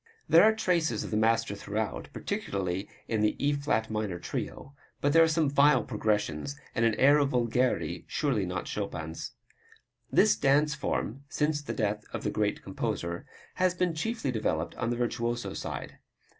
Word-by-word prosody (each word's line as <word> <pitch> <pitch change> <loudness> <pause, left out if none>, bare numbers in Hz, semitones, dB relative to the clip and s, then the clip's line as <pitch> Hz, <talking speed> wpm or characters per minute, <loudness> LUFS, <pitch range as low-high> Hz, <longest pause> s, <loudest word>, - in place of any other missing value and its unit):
There 165 - +7
are 220 0 +5
traces 170 - +1
of - - -7
the - - 0
master 115 0 +2
throughout, 105 +1 -3
particularly 95 0 -3 0.2
in 110 -2 0
the 105 - +2
E 145 +1 +1
flat 140 -6 0
minor 105 -4 -2
Trio, 135 +9 -5 0.3
but 145 0 +1
there 165 - +7
are 165 - +6
some 160 -1 +2
vile 145 +1 +4
progressions 105 - -1
and 115 - 0
an 115 -2 +3
air 145 +3 +6
of 140 -1 +2
vulgarity 120 - 0
surely 135 -9 0
not 90 -1 -3
Chopin's. 80 -6 -4 0.8
This - - +5
dance 145 +2 +3
form, 140 -2 -3
since 150 0 0
the 145 - -5
death 105 -2 -1
of - - -4
the - - 0
great - - -1
composer, 85 0 -3 0.3
has 185 -1 +3
been 180 -1 +1
chiefly 160 - -2
developed 90 -8 -1
on 115 - -2
the 120 - 0
virtuoso 120 0 -1
side. - - -6
120 Hz, 170 wpm, -29 LUFS, 105-145 Hz, 0.8 s, There